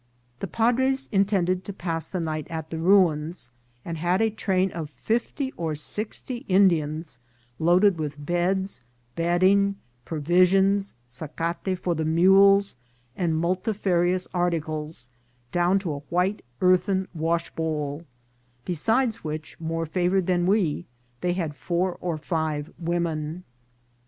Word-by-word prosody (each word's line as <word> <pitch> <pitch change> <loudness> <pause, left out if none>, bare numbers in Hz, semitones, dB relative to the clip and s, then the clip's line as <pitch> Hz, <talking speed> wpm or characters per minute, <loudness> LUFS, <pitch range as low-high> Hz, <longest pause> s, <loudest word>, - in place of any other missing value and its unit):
The - - -3
padres 260 +4 +1
intended 190 -3 +2
to 200 - -5
pass 165 -4 -3
the 185 - -3
night 155 -2 -3
at 160 -2 -5
the 160 - -3
ruins, 165 -6 +2 0.3
and 165 -1 -4
had 175 +3 +1
a 220 0 +2
train 190 -3 0
of 160 -3 -5
fifty 240 - -2
or 160 -2 -2
sixty 215 - -5
Indians 160 -7 +2 0.4
loaded 175 +2 +4
with 150 -2 -3
beds, 180 -1 0 0.3
bedding, 185 +4 +3 0.3
provisions, 185 +5 +2
sacate 165 +8 -3
for 175 -1 -1
mules, 190 +5 +4 0.4
and 165 -3 0
multifarious 185 0 0
articles, 160 -6 -2 0.4
down 175 +2 +3
to 190 -4 -2
a 145 - -5
white 180 +4 0 0.2
earthen 185 +1 +3
washbowl; 160 -2 -2 0.6
besides 225 - 0
which, 155 0 -6
more 165 0 -2
favoured 180 +3 +1
than 175 -1 +1
we, 180 -5 +1 0.3
they 175 +4 0
had 165 -5 -2
four 175 +3 -1
or 170 -3 -2
five 155 -2 -2
women. 170 -1 -2
175 Hz, 120 wpm, -25 LUFS, 160-190 Hz, 0.6 s, loaded